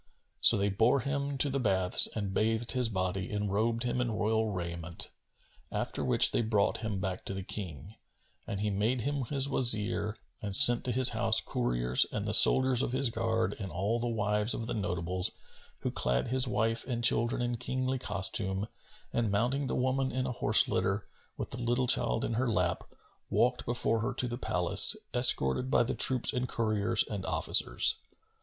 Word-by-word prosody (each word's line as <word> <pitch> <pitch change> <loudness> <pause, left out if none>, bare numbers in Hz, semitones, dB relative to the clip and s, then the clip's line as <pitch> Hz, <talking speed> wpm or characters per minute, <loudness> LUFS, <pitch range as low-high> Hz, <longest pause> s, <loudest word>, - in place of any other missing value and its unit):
So - - +7
they 100 +1 -1
bore 115 +7 +1
him 140 0 -4
to 145 - +3
the 140 0 -3
Baths 95 -6 +4
and 100 -3 -4
bathed 115 +3 -1
his 125 -3 0
body 95 -2 -3
and 105 -1 -3
robed 115 +3 -1
him 125 0 -2
in 125 - -2
royal 110 +1 -1
raiment, 85 -2 -7 0.6
after - - -4
which - - +4
they - - 0
brought 110 -3 0
him 110 -3 -5
back 95 -1 -5
to 100 - -4
the 95 - -6
King, 90 - -8 0.5
and 100 - -5
he 105 0 -2
made 110 +5 -1
him 140 +1 -3
his 135 +2 +4
Wazir 110 -5 +2 0.2
and 100 -2 -3
sent 120 +3 +8
to 125 - -2
his 130 +1 +5
house - - +2
couriers - - 0
and 105 -1 -4
the 105 - -3
soldiers 130 +2 +5
of 125 - -3
his 130 -2 0
guard 115 0 -2
and 95 -4 -7
all 100 +8 -2
the 120 - -3
wives 105 -1 -1
of 115 - -5
the 120 - -5
notables, 90 -2 -3 0.5
who - - -3
clad 60 - -2
his 130 +1 +1
wife 115 -1 -1
and 120 -2 -4
children 120 0 +1
in 120 -1 -3
Kingly 130 +2 -3
costume 100 -1 -2 0.5
and 115 -2 -1
mounting 125 +7 -1
the - - -3
woman 130 +1 -1
in 130 0 -3
a 130 - -3
horse 110 -3 +3
litter, 95 +3 -2 0.3
with - - -6
the 120 - -6
little 120 +2 -1
child - - +1
in - - -4
her 120 +2 -1
lap, 90 -5 -1 0.4
walked 125 +1 -1
before 115 -1 0
her 120 +3 -4
to 125 - -1
the 120 +1 -6
palace, 90 -7 +4 0.2
escorted 125 - +3
by - - +2
the 120 - -4
troops 130 -2 0
and 125 0 -3
couriers 110 -3 0
and 100 -3 -6
officers. - - +2
110 Hz, 190 wpm, -29 LUFS, 100-125 Hz, 0.6 s, sent